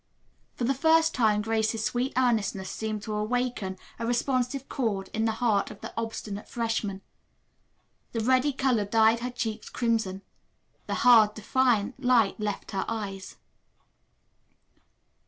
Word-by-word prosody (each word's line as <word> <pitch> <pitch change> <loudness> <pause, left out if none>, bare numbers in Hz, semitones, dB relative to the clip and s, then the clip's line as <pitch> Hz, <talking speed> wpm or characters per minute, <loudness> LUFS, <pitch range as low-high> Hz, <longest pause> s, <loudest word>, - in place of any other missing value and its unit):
For - - -4
the 260 +3 +2
first 320 +3 +3
time 215 -4 +2
Grace's 220 0 0
sweet 250 +2 -1
earnestness 220 -6 +1
seemed 215 -1 -4
to 215 - -4
awaken 215 -3 -2 0.2
a 230 - -2
responsive 255 +2 0
chord 215 -8 -2
in 220 +1 0
the 225 - +1
heart 220 -3 +1
of - - -11
the - - -7
obstinate 220 -2 -5
freshman. 225 -4 -2 1.1
The 230 - -2
ready 255 +5 +3
color 255 -6 +1
dyed 220 +2 +4
her 245 +1 -3
cheeks 225 -3 -4
crimson. 220 -5 -1 0.6
The - - -1
hard, 220 -4 +7
defiant 245 +2 +1
light 240 -5 +3
left 210 -1 -4
her 195 - -1
eyes. 200 -4 -5
225 Hz, 135 wpm, -27 LUFS, 210-250 Hz, 1.1 s, hard